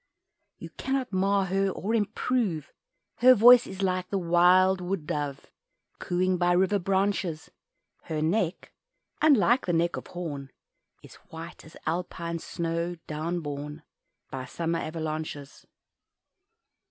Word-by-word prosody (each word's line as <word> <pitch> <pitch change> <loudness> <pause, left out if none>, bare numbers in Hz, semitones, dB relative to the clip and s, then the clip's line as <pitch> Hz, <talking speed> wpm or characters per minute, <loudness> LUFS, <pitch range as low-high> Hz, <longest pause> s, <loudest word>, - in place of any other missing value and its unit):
You - - -10
cannot 265 -4 -3
mar 195 +1 +2
her 195 +1 +1
or 205 +3 -3
improve 215 - -1 0.5
Her 255 +2 +7
voice 245 +2 +7
is 190 +1 -5
like 185 -1 -1
the 200 - -1
wild 180 +2 +4
wood 180 -3 -3
dove 145 -2 -4 0.5
Cooing 180 0 0
by 175 0 +3
river 190 +3 +2
branches, 190 -3 -1 0.5
Her 155 -1 -3
neck 170 +3 -1 0.5
(unlike 260 -5 +4
the 175 - +1
neck 170 +1 +1
of - - -8
Horn) 145 -6 -6 0.5
Is - - -14
white 165 +1 -9
as 160 - -14
Alpine 170 0 -3
snow 170 +1 -3
down 165 +3 -3
borne 145 +1 -6 0.5
By 130 -1 -5
summer 165 +5 -2
avalanches. 155 -3 -5
175 Hz, 125 wpm, -27 LUFS, 160-195 Hz, 0.5 s, Her